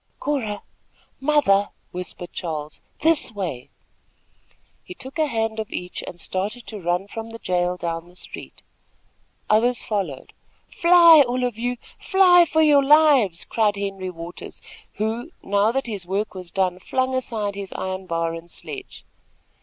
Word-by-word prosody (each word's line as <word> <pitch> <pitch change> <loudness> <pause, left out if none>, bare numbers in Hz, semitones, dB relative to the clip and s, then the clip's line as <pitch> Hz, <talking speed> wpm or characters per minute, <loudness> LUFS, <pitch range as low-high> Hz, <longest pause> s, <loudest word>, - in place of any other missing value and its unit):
"Cora! 230 -9 -2 0.6
Mother!" 265 -9 +3 0.2
whispered 180 0 -6
Charles, 155 -4 -5 0.2
"this 320 -5 +3
way!" 175 - -5 1.1
He 360 - -10
took 270 +1 -8
a 310 - +3
hand 225 -3 -1
of 220 - -4
each 180 0 -5
and 175 - -8
started 205 +8 -3
to 215 - -7
run 175 +3 -1
from 225 +2 -7
the 230 - -8
jail 180 -3 0
down 170 0 -4
the 180 - -19
street. - - -9 0.8
Others 235 +3 +2
followed. 190 -11 -3 0.4
"Fly! 335 -3 +7
all 250 +1 -1
of 245 -3 -1
you! 245 +1 -1 0.2
Fly 360 -3 +6
for 315 -1 +2
your 290 -2 +5
lives!" 275 - +5
cried 215 -2 +1
Henry 195 -2 -4
Waters, 170 0 -9 0.3
who, 225 +7 -3
now 205 +2 +2
that 270 +2 -1
his 205 -6 -5
work 200 +3 -2
was 185 -2 -8
done, 185 -1 0
flung 260 +6 -1
aside 225 -5 -2
his 200 -1 -7
iron 190 0 -4
bar 165 -1 -1
and 165 +1 -9
sledge. 395 - -9
210 Hz, 150 wpm, -23 LUFS, 180-260 Hz, 1.1 s, Fly